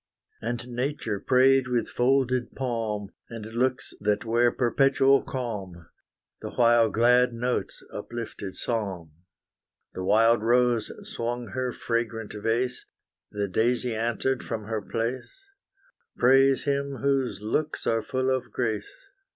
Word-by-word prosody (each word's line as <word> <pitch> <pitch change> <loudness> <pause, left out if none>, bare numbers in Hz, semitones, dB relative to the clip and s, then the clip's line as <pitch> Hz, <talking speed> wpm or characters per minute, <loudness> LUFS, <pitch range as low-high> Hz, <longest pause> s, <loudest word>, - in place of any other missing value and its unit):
And 120 +1 -3
nature 125 -4 -2
prayed 130 +2 +4
with 125 -1 0
folded 130 -1 +1
palm, 110 -6 -3 0.2
And 115 -3 -7
looks 125 +3 -1
that 105 +2 0
wear 120 +1 +3
perpetual 135 +2 +3
calm, 100 -9 -5 0.5
The - - -5
while 120 -2 +5
glad 125 +2 +4
notes 125 +2 -2
uplifted 110 -5 -6
psalm. 95 -9 -3 0.8
The 95 - -5
wild 115 +4 +4
rose 120 0 +2 0.2
swung 120 - -4
her 130 -1 -2
fragrant 115 -2 -3
vase, 115 +4 -1 0.5
The 100 -1 -2
daisy 120 +4 +1
answered 120 +3 -1
from 110 - -4
her 110 0 -3
place, 120 - -4 0.7
Praise 135 +1 +5
Him 140 -2 -2
whose 130 -7 0
looks 150 +8 -1
are 115 -1 +2
full 130 +3 0
of 130 - -5
grace. 110 -3 -2
120 Hz, 120 wpm, -26 LUFS, 110-130 Hz, 0.8 s, while